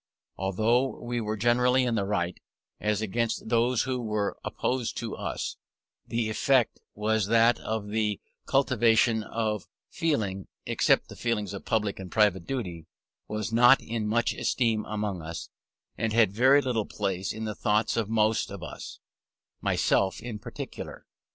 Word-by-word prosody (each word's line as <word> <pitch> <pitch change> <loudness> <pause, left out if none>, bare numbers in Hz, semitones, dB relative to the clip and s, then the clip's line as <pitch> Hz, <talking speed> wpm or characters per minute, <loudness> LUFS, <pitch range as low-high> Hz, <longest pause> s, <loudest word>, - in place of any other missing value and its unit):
Although 110 +7 +1
we 120 0 -2
were 110 0 -2
generally 125 +3 +3
in 120 -2 0
the 100 -3 0
right, 90 -4 -1 0.4
as 105 0 0
against 115 +2 -1
those 120 +1 +2
who 130 -2 -2
were 105 -3 -1
opposed 125 -2 -2
to 115 -2 -4
us, - - -4 0.5
the 115 -1 -1
effect 125 +2 +2 0.2
was 105 -1 +1
that 115 +2 +5
the 105 -1 -2 0.3
cultivation 120 -4 +3
of 105 -3 -2 0.2
feeling 110 - -1 0.2
(except - - +2
the - - -10
feelings 105 -4 -2
of 100 - -7
public 105 -3 0
and 95 -2 -8
private 105 -6 +2
duty) 90 -12 -4 0.4
was 110 +1 -3
not 120 +3 +7
in 110 -2 -3
much 115 +2 +1
esteem 115 -4 0
among 105 -4 -3
us, 80 -1 -6 0.5
and 110 -1 0
had 110 -4 +4
very 135 +6 +5
little 115 -5 -1
place 95 -2 -2
in 110 - -5
the 110 -1 -2
thoughts 105 +1 +1
of 110 -3 -1
most 110 0 +2
of - - -8
us, - - -8 0.6
myself 95 -2 +2
in 115 -3 -6
particular. - - -8
110 Hz, 150 wpm, -28 LUFS, 105-120 Hz, 0.6 s, not